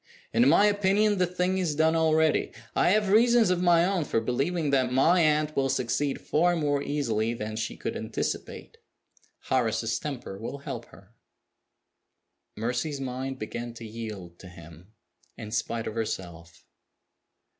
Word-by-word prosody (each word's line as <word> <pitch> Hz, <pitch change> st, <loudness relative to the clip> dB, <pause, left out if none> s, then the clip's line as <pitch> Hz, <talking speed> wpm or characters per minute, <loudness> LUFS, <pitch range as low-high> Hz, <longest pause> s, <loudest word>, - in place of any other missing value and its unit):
In 240 Hz, -, +5 dB
my 205 Hz, -, +5 dB
opinion, 205 Hz, 0 st, +2 dB
the 180 Hz, -, +3 dB
thing 180 Hz, +1 st, -1 dB
is 165 Hz, -5 st, -1 dB
done 160 Hz, +2 st, +3 dB
already. 160 Hz, -1 st, +2 dB, 0.2 s
I -, -, +3 dB
have 210 Hz, +1 st, +2 dB
reasons 230 Hz, -1 st, +5 dB
of 180 Hz, -1 st, +1 dB
my 175 Hz, -1 st, +4 dB
own 190 Hz, -3 st, 0 dB
for 120 Hz, -, 0 dB
believing 140 Hz, +7 st, -1 dB
that 130 Hz, -2 st, +2 dB
my 160 Hz, +8 st, +4 dB
aunt 155 Hz, -1 st, +2 dB
will 135 Hz, -1 st, +1 dB
succeed 135 Hz, +3 st, -1 dB
far 175 Hz, +3 st, +1 dB
more 145 Hz, -3 st, 0 dB
easily 120 Hz, -6 st, -1 dB
than 110 Hz, -1 st, -5 dB
she 110 Hz, 0 st, -4 dB
could -, -, -4 dB
anticipate. -, -, -5 dB, 0.7 s
Horace's 115 Hz, -2 st, 0 dB
temper 125 Hz, -9 st, -6 dB
will 115 Hz, +6 st, -5 dB
help 120 Hz, -4 st, -7 dB
her." 100 Hz, +3 st, -19 dB, 1.4 s
Mercy's 125 Hz, +6 st, -2 dB
mind 130 Hz, 0 st, -4 dB
began 120 Hz, +1 st, -6 dB
to 115 Hz, -, -9 dB
yield 105 Hz, -6 st, -8 dB
to 95 Hz, -, -11 dB
him, 85 Hz, +2 st, -14 dB, 0.5 s
in 110 Hz, -2 st, -8 dB
spite 115 Hz, +1 st, -2 dB
of 110 Hz, -, -4 dB
herself. 85 Hz, -7 st, -6 dB
135 Hz, 150 wpm, -27 LUFS, 115-170 Hz, 1.4 s, In